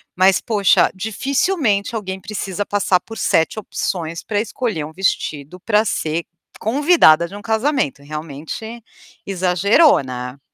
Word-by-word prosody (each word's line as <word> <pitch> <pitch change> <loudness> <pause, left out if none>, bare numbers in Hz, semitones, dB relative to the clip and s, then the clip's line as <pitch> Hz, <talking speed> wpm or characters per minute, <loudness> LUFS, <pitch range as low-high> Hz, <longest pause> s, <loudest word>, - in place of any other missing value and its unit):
Mas 185 +1 +4
poxa, 205 -4 +3
dificilmente 235 - 0
alguém 190 -3 -4
precisa 205 -1 -4
passar 200 -3 +1
por 225 +3 -10
7 165 +3 +1
opções 170 -5 -4
pra 205 -2 -1
escolher 220 -7 -3
um 155 - -10
vestido 160 -3 -2
pra 210 +2 +2
ser 165 -4 -2 0.4
convidada 245 - +4
de 170 - -14
um - - -10
casamento, 220 - -1
realmente, 155 +10 -7 0.4
exagerou, 195 - +3
né? 125 0 -7
195 Hz, 125 wpm, -19 LUFS, 165-220 Hz, 0.4 s, Mas